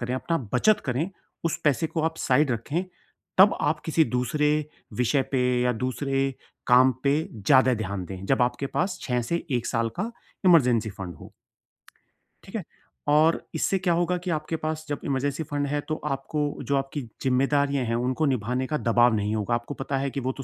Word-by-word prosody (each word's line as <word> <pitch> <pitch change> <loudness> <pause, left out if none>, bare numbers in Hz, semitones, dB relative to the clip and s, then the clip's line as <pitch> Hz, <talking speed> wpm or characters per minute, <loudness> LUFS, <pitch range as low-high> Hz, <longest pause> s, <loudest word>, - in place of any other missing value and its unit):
करें, 125 +1 -2
अपना 165 +5 -1 0.2
बचत 210 +12 +4
करें 135 +8 -1 0.3
उस 165 - 0
पैसे 150 +2 +2
को 160 - -2
आप 160 0 -1
साइड 140 +2 +2
रखें 150 +10 -2 0.5
तब 195 +2 +7
आप 150 +1 +1
किसी 160 0 +3
दूसरे 150 +4 +1 0.5
विषय 125 +3 +2
पे 130 - +2 0.2
या 125 - +2
दूसरे 135 +1 -1 0.3
काम 130 +1 +6
पे 140 - +4 0.2
ज़्यादा 130 +4 +4
ध्यान 100 -4 -4
दें 95 0 -7
जब 135 +2 +2
आपके 120 +3 0
पास 185 +1 0
6 125 -2 0
से 170 - 0
1 120 -2 0
साल 115 -2 0
का 220 +4 -2 0.4
इमरजेंसी 125 -10 +5
फंड 95 -3 -7
हो। - - -13 1.1
ठीक - - -11
है, - - -2 0.4
और 155 +3 +4
इससे 195 - +1
क्या 180 -2 +1
होगा 175 +1 +1
कि 185 - -3
आपके 155 0 -2
पास 155 0 -3
जब 145 - -2
इमरजेंसी 140 +3 -1
फंड 145 -1 -2
है 145 +1 -1
तो 155 - 0
आपको 145 +2 -2 0.2
जो 140 - 0
आपकी 135 +2 -3 0.2
जिम्मेदारियाँ 135 +1 +2
हैं 115 0 -1
उनको 130 +6 0
निभाने 125 -1 0
का 150 - -1
दबाव 120 -2 +3
नहीं 105 +1 -1
होगा, 110 +2 0
आपको 120 +4 -4
पता 135 0 -3
है 135 +1 -1
कि 140 - -3
वो 130 0 -1
तो 135 - -5
135 Hz, 190 wpm, -26 LUFS, 125-155 Hz, 1.1 s, तब